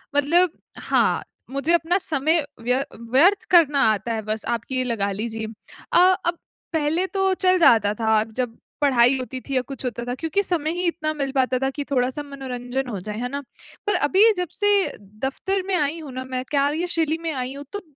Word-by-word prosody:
मतलब 330 +4 +4 0.3
हाँ, - - +1 0.3
मुझे 280 +5 +1
अपना 345 +2 +2
समय 315 -2 +1 0.2
व्य 250 +3 +1 0.3
व्यर्थ 365 +10 +5
करना 300 -5 +5
आता 220 +2 -2
है 220 - -2
बस 215 +1 -4
आप 230 - -6
ये 255 -1 +1
लगा 210 -5 -1
लीजिए। 220 +2 -4 0.5
अ, - - +6 0.3
अब 345 0 0 0.4
पहले 320 +4 +1
तो 385 -1 +1
चल 370 0 +3
जाता 220 -9 +5
था 220 -1 +3
जब 230 +1 -4 0.2
पढ़ाई 260 -2 +5
होती 255 0 -5
थी 275 0 -5
या 255 - +3
कुछ 275 -1 -7
होता 240 -1 -3
था 245 - -3
क्योंकि 325 +7 0
समय 320 -4 -1
ही 355 +1 -3
इतना 310 -2 -1
मिल 275 -3 -3
पाता 255 -1 +2
था 270 - 0
कि 290 - -3
थोड़ा-सा 260 +2 0
मनोरंजन 265 -2 -5
हो 200 -4 -4
जाए, 210 +3 -6
है 245 +1 -3
ना? 280 +1 -4 0.5
पर 415 - +2
अभी 425 +4 +6
जब 360 - -1
से 410 - 0 0.6
दफ़्तर 380 +8 -1
में 390 - -1
आई 305 0 0
हूँ 295 -4 -8
ना 260 0 -4
मैं 255 -1 -3
कार्यशैली 315 +3 0
में 325 - -1
आई 255 0 -3
हूँ 285 +1 -8
तो 410 - -3
275 Hz, 195 wpm, -23 LUFS, 250-330 Hz, 0.6 s, अ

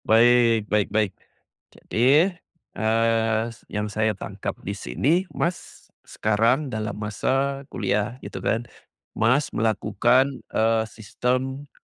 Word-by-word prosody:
Baik 115 -1 +5
baik 105 -1 +1
baik. 105 -1 +1 0.6
Jadi, 145 - +2 0.4
eee, 115 +1 +1 0.3
yang 105 0 -2
saya 105 0 -1
tangkap - - -5
di - - -2
sini 125 - 0 0.2
Mas, 175 +1 -4 0.2
sekarang 115 +6 +1
dalam 110 -1 -3
masa 135 +6 -1
kuliah 105 +3 -1
gitu - - -7
kan. 115 +2 0 0.5
Mas, 130 +6 +1
melakukan, 115 +5 +1
eee, 110 0 +2
sistem 130 +6 -3
115 Hz, 105 wpm, -24 LUFS, 110-130 Hz, 0.6 s, Baik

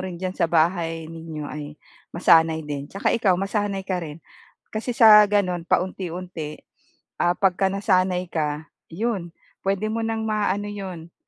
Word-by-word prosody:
rin 185 -2 -5
diyan 185 +1 -3
sa 170 - 0
bahay 165 0 +1
ninyo, 160 -2 -7
ay 150 0 -7 0.3
masanay 160 -2 +4
din. 145 -1 -5
Tsaka 195 - -1
ikaw, 195 -6 +3
masanay 195 0 -2
ka 185 -2 -2
rin, 155 -3 -7 0.6
kasi 230 +2 -3
sa 215 -2 +9
gano'n, 180 -4 0
paunti-unti, 180 -4 -2 0.6
ah, 175 +1 +2
pagka-nasanay 185 -1 +1
ka, 150 -1 -2 0.2
'yon, 200 -2 -2 0.4
puwede 195 +2 0
mo 230 - -1
nang 225 0 -2
ma 210 -1 +1
ano 205 +1 -4
'yon, 180 -5 -7
180 Hz, 145 wpm, -23 LUFS, 165-200 Hz, 0.6 s, sa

